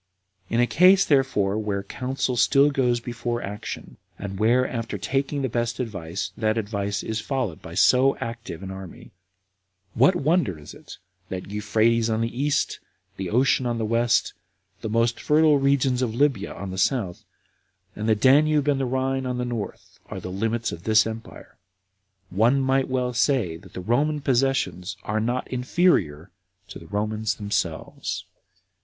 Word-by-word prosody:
In 115 - 0
a 120 - +5
case, 185 +8 +5
therefore, 110 -8 +2
where 100 -2 -2
counsel 130 +2 -2
still 140 +4 +4
goes 125 -3 +1
before 120 0 -4
action, 105 +1 -7 0.2
and 95 -1 -6
where, 120 +4 +3
after 115 -2 -4
taking 140 +1 -1
the - - +1
best 120 0 -2
advice, 95 -6 -4
that 110 0 0
advice 100 -2 -2
is 110 0 -3
followed 125 - -3
by 85 - -9
so 130 +7 +4
active 115 -6 -6
an 95 - -6
army, 95 -2 -10 0.8
what 135 +10 +4
wonder 150 - +1
is 75 - -11
it - - -12 0.3
that 95 +1 -6
Euphrates 110 +2 +1
on 110 0 0
the 115 +1 -2
east, 145 +2 0 0.4
the 95 -2 -4
ocean 125 +3 +2
on 120 -1 -1
the 115 - -1
west, 115 +1 +1 0.5
the 110 - -4
most 115 +1 +1
fertile 150 -1 +4
regions 135 -2 +2
of 115 -3 -1
Libya 130 -7 +1
on 95 -1 -6
the 95 - -4
south, 100 -6 0 0.7
and 110 +1 -2
the 110 - +5
Danube 145 +5 +4
and 140 -2 +2
the 135 - 0
Rhine 130 +1 -1
on 125 -1 -2
the 125 - -2
north, 120 -4 -6
are - - -6
the 90 - -7
limits 115 +4 -1
of 85 - -7
this 110 +3 +4
empire? 110 0 -9 0.7
One 115 +8 +3
might 135 0 +1
well 125 -1 -1
say 115 - +1
that 85 - -17
the 90 - -6
Roman 145 +10 +1
possessions 120 - 0
are 110 +1 -1
not 120 +3 -1
inferior 125 - +1 0.4
to - - -8
the - - -13
Romans 105 +1 -1
themselves. 105 -1 -3
115 Hz, 165 wpm, -24 LUFS, 105-130 Hz, 0.8 s, a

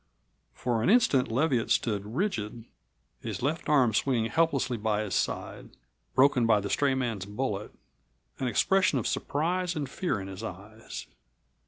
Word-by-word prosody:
For 120 -2 -1
an 115 - +2
instant 200 - +4
Leviatt 125 0 +1
stood 105 0 0
rigid, 120 - -2 0.5
his - - -5
left 155 +5 -1
arm 130 -7 +4
swinging 115 0 +1
helplessly 155 -6 +1
by 105 -1 0
his 105 - -5
side, - - -2 0.5
broken 130 -3 +4
by 110 -2 +5
the 100 0 -4
stray 140 -2 +2
man's 115 -7 -2
bullet, 105 -1 -3 0.7
an 130 - -1
expression 185 - +3
of 120 - -2
surprise 175 +4 -1
and 145 -3 -2
fear 135 - -2
in 95 - -6
his 95 +1 -8
eyes. 110 +2 -8
125 Hz, 150 wpm, -28 LUFS, 110-145 Hz, 0.7 s, by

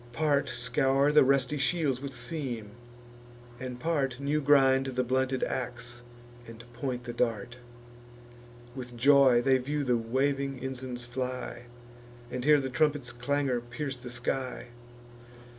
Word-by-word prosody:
Part 145 -1 +1
scour 135 +4 +1
the 150 - +7
rusty 140 +1 +2
shields 140 -3 +1
with 140 -1 -5
seam; 125 -10 -4 0.9
and 125 -1 -6
part 135 -5 -1
New 145 +2 0
grind 135 -2 +4
the 130 -1 -1
blunted 130 +1 0
ax, 120 -1 -4 0.5
and 115 0 -11
point 125 0 -4
the 120 -1 -6
dart: 115 0 -1 1.2
With 125 -2 -8
joy 135 -1 +6
they 130 0 +4
view 145 +3 -2
the 125 -3 +2
waving 135 +4 -1
ensigns 130 -1 -6
fly, 125 -1 -5 0.7
And 125 0 -3
hear 150 +1 +6
the 135 -1 -4
trumpet's 145 -2 +1
clangour 130 +1 0
pierce 135 +4 -5
the 125 0 -9
sky. 125 0 -3
130 Hz, 130 wpm, -29 LUFS, 120-140 Hz, 1.2 s, the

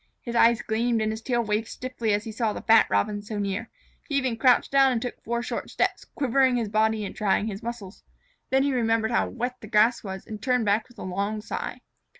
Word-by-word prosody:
His 240 -1 -6
eyes 235 0 +4
gleamed 230 +1 0
and 215 0 0
his 220 +1 -5
tail 240 0 0
waved 215 +1 -1
stiffly 250 -3 -3
as 205 0 +1
he 225 - -6
saw 220 -1 -1
the - - -7
fat 225 +1 +6
Robins 205 -1 0
so 215 - -4
near. 205 +3 -3 0.4
He 285 - -1
even 260 -4 +1
crouched 245 +2 +3
down 270 -1 +5
and 240 - 0
took 245 +1 -6
four 235 +1 -2
short - - -4
steps, - - -1
quivering 265 -2 +3
his 230 -3 -1
body 215 0 +1
and - - -7
trying 205 0 +1
his 210 -1 -5
muscles. 230 -5 -7 0.5
Then 265 0 +3
he 280 -1 +1
remembered 225 -2 +1
how - - +1
wet 245 +1 -4
the 215 - -9
grass 220 +2 +3
was 190 -2 -6
and 215 -1 -8
turned 250 -1 +1
back 210 +4 +1
with 245 - -20
a - - -7
long 200 +4 -2
sigh. 210 - -5
225 Hz, 230 wpm, -26 LUFS, 210-245 Hz, 0.5 s, fat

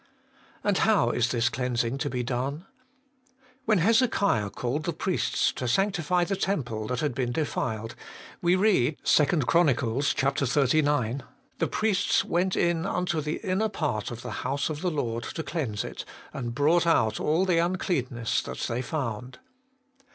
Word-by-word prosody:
And 205 -2 +2
how 195 - +3
is 120 -1 +1
this 120 -1 +1
cleansing 125 0 -1
to 145 - -1
be 125 -2 -2
done? 135 +7 -3 1.0
When 215 -2 +3
Hezekiah 200 - +2
called 130 +8 -3
the 170 - -1
priests 180 +3 0
to 125 - -4
sanctify 180 - +1
the 195 +3 -1
temple 125 - -2
that 125 -1 -2
had 150 -4 0
been 125 -1 -1
defiled, 115 -6 -2 0.5
we 175 +1 +3
read 185 - +2
(2 150 - +5 0.2
Chron. 165 +7 +3
xxix.), 135 +1 +1 0.2
' 270 - -39
The - - +1
priests 210 -2 +1
went 180 +2 0
in 170 +1 +1
unto 180 -4 -1
the 150 +1 -3
inner 195 +4 +1
part 140 - -2
of 120 -1 -7
the - - -5
house 140 +4 -1
of 150 0 -5
the 180 - +1
Lord 120 -7 -2
to 160 - -5
cleanse 135 -11 -3
it, - - -6 0.3
and 120 -3 -4
brought 165 +5 +3
out 110 -9 +2
all 165 +5 +2
the 175 -3 +2
uncleanness 155 - 0
that 65 - -7
they 120 +1 -1
found.' 125 -3 -4
145 Hz, 160 wpm, -27 LUFS, 120-175 Hz, 1.0 s, 2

